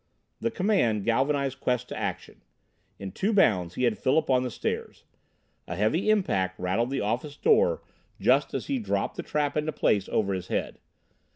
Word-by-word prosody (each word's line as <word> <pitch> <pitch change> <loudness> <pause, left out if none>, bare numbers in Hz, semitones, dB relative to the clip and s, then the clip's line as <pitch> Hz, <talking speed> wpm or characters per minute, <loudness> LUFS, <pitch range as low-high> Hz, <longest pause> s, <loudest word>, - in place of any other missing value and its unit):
The 230 - 0
command 180 - +1
galvanized 135 +3 +1
Quest 125 -1 -1
to - - -5
action. - - -5 0.6
In 95 -1 -6
two 200 +3 -1
bounds 90 - +3
he - - -2
had 120 -3 +1
Philip 140 +2 +2
on 130 -1 +4
the 125 - -2
stairs. - - -4 0.6
A 85 - -4
heavy 110 - +1
impact 95 - +1
rattled 95 +7 0
the 135 - -1
office 125 +8 -2
door 485 +2 +3 0.4
just - - +2
as - - -3
he 275 -2 -1
dropped 220 - -2
the - - -4
trap 150 -3 -1
into 155 +1 0
place 100 -9 +1
over 100 -2 0
his 95 -1 -4
head. - - -3
130 Hz, 175 wpm, -27 LUFS, 105-160 Hz, 0.6 s, on